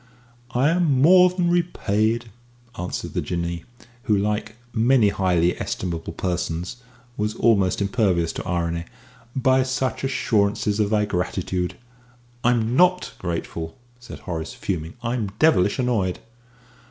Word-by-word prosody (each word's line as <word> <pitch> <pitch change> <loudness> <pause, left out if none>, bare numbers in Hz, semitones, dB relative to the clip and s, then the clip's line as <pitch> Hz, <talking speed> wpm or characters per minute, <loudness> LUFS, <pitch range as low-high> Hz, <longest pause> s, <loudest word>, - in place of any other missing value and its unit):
"I 130 +4 +4
am 165 -6 +2
more 180 +5 +7
than 180 -1 0
repaid," 115 - 0 0.4
answered 90 +1 -4
the - - 0
Jinnee, 85 -1 -3 0.4
who, 105 -3 +3
like 105 +2 -1 0.2
many 115 -1 +4
highly 90 -3 +1
estimable 85 -3 -3
persons, 90 +1 -3 0.4
was 105 +1 -1
almost 100 -5 +2
impervious 95 -6 +1
to - - -6
irony, 85 -1 -1 0.5
"by 130 0 +3
such 130 -1 -1
assurances 105 -5 +1
of 105 -1 +2
thy 105 -1 +2
gratitude." 90 -1 -2 0.7
"I'm 120 -1 +2
not 180 +2 +3
grateful," 85 -2 -4 0.2
said 120 - -10
Horace, 80 -3 -5
fuming. 85 0 -4
"I'm 115 -4 -2
devilish 105 - +4
annoyed!" 110 -8 0
105 Hz, 120 wpm, -23 LUFS, 90-125 Hz, 0.7 s, more